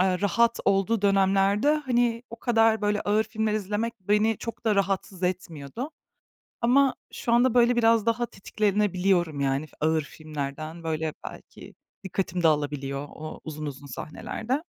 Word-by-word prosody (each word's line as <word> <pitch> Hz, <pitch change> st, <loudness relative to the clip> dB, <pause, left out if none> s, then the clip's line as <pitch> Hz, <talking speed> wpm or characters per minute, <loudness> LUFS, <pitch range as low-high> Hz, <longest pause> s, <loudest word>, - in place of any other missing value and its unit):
ııı, 185 Hz, 0 st, +2 dB
rahat 230 Hz, +4 st, +2 dB
olduğu 200 Hz, +2 st, +2 dB
dönemlerde 195 Hz, +6 st, +3 dB
hani 245 Hz, -5 st, +1 dB
o 230 Hz, -, -7 dB
kadar 225 Hz, -2 st, +3 dB
böyle 210 Hz, 0 st, +1 dB
ağır 215 Hz, +2 st, +2 dB
filmler 220 Hz, -1 st, -1 dB
izlemek 215 Hz, +3 st, -2 dB
beni 210 Hz, +3 st, +2 dB
çok 230 Hz, 0 st, -7 dB
da 215 Hz, -2 st, +3 dB
rahatsız 195 Hz, -1 st, -1 dB
etmiyordu. 180 Hz, -, -3 dB, 0.7 s
Ama 260 Hz, +3 st, +4 dB, 0.2 s
şu 235 Hz, -, -3 dB
anda 245 Hz, 0 st, +4 dB
böyle 240 Hz, 0 st, +4 dB
biraz 230 Hz, -2 st, +4 dB
daha 230 Hz, +1 st, +1 dB
tetiklenebiliyorum 195 Hz, -6 st, 0 dB
yani 135 Hz, +2 st, 0 dB, 0.2 s
ağır 160 Hz, +1 st, +2 dB
filmlerden. 155 Hz, +2 st, -6 dB
Böyle 160 Hz, -1 st, -2 dB
belki -, -, -11 dB, 0.3 s
dikkatim 185 Hz, -1 st, -2 dB
dağılabiliyor 145 Hz, -2 st, 0 dB
o 155 Hz, 0 st, -8 dB
uzun 155 Hz, -1 st, -6 dB
uzun 140 Hz, 0 st, -7 dB
sahnelerde. 220 Hz, -, -4 dB
200 Hz, 140 wpm, -26 LUFS, 160-230 Hz, 0.7 s, Ama